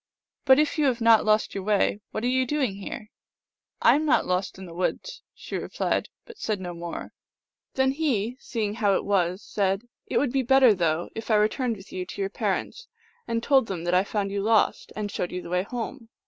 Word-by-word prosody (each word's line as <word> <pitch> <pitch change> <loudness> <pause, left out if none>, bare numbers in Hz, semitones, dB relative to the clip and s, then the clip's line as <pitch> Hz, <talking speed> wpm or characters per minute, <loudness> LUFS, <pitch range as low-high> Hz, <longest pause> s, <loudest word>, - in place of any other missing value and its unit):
" - - -56
But, 265 -2 +7
if 305 +1 +1
you 300 - +3
have 255 -3 +1
not 230 -2 +5
lost 215 0 +2
your 195 - -4
way, 205 0 +1
what 215 - -4
are - - +1
you 260 +1 +2
doing 260 -8 0
here? 210 +1 -7 0.4
" - - -55
"I - - +7
am 300 - +1
not 305 - +3
lost 180 +1 -1
in 190 - -9
the 170 - -10
woods," 185 - -3
she - - -7
replied, - - -2 0.2
but 465 -3 -13
said 215 -3 -1
no 180 -1 -5
more. 170 0 -7 0.6
Then 265 0 +3
he, 250 -6 -1
seeing 215 -6 -3
how 205 -3 +2
it - - -1
was, 185 -1 +1
said, 195 0 0
" - - -58
It - - -1
would 280 -4 +1
be 270 +1 +1
better, 260 -2 +6
though, 170 -2 -1
if 225 - -7
I 220 - +4
returned 220 +3 +1
with 190 +1 -14
you 180 -1 -4
to - - -9
your 195 0 -1
parents, 475 - -3 0.4
and 230 0 -1
told 270 -4 +4
them 180 -4 -4
that 175 +1 -1
I 180 +1 +4
found 200 -1 -2
you 200 0 -1
lost, 220 +1 +2
and 210 -1 -3
showed 180 - -3
you 180 0 -5
the - - -9
way 180 0 +2
home." 235 +3 -6
215 Hz, 230 wpm, -26 LUFS, 190-255 Hz, 0.6 s, But